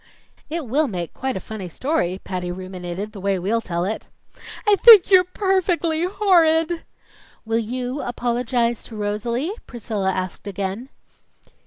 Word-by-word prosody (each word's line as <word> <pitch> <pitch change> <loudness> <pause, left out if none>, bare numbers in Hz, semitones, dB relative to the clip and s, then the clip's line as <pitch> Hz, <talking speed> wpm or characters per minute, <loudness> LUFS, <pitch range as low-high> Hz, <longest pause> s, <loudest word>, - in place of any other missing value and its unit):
"It 325 -1 -3
will 285 +6 +1
make 175 -7 -5
quite 265 -3 -3
a - - -3
funny 195 -3 -7
story," 190 - -1
Patty 180 -2 -4
ruminated, 185 +2 -6
"the 200 - -10
way 195 0 +1
we'll 205 +6 0
tell 175 -4 -2
it." 215 +3 -4 0.6
"I 420 -1 +6
think 430 -4 +8
you're 370 -1 +8
perfectly 360 -3 0
horrid!" 340 -4 +3 0.6
"Will 225 +1 +1
you 250 +4 -3
apologize 240 -1 -1
to 225 - -10
Rosalie?" 215 - -2 0.2
Priscilla 210 -5 -2
asked 185 +2 -4
again. 200 +5 -4
235 Hz, 140 wpm, -22 LUFS, 195-320 Hz, 0.6 s, think